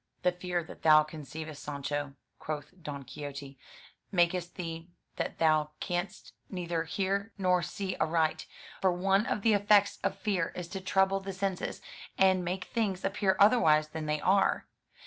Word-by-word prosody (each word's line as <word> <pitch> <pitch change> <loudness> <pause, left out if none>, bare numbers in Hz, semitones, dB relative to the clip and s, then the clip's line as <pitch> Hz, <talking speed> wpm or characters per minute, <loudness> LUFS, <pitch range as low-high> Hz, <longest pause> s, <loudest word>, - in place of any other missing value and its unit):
"The 180 - +4
fear 180 -1 -2
that - - -12
thou 155 -1 +7
conceivest, 155 0 -8
Sancho," 145 0 -4 0.2
quoth 150 +1 -5
Don 145 -3 -6
Quixote, 140 +1 -8 0.5
"makest 175 -1 +1
thee 165 -2 -6 0.3
that - - -3
thou 155 -2 +2
canst 175 +3 -4 0.2
neither 170 -3 -2
hear 200 +5 -1
nor 180 -2 +3
see 190 +3 -4
aright; 160 -1 +1 0.3
for 190 - +4
one 195 +4 +2
of 200 - -1
the 225 - +5
effects 205 0 +4
of 195 - 0
fear 190 -6 -1
is 180 -1 -5
to 190 0 -5
trouble 190 +1 +2
the 195 0 -6
senses, 190 -1 -3 0.3
and 190 -1 +4
make 180 +1 -2
things 200 -5 -2
appear 195 -1 +1
otherwise 160 -9 +5
than 155 0 -5
they 150 0 0
are. 195 +5 +2
175 Hz, 155 wpm, -30 LUFS, 155-195 Hz, 0.5 s, thou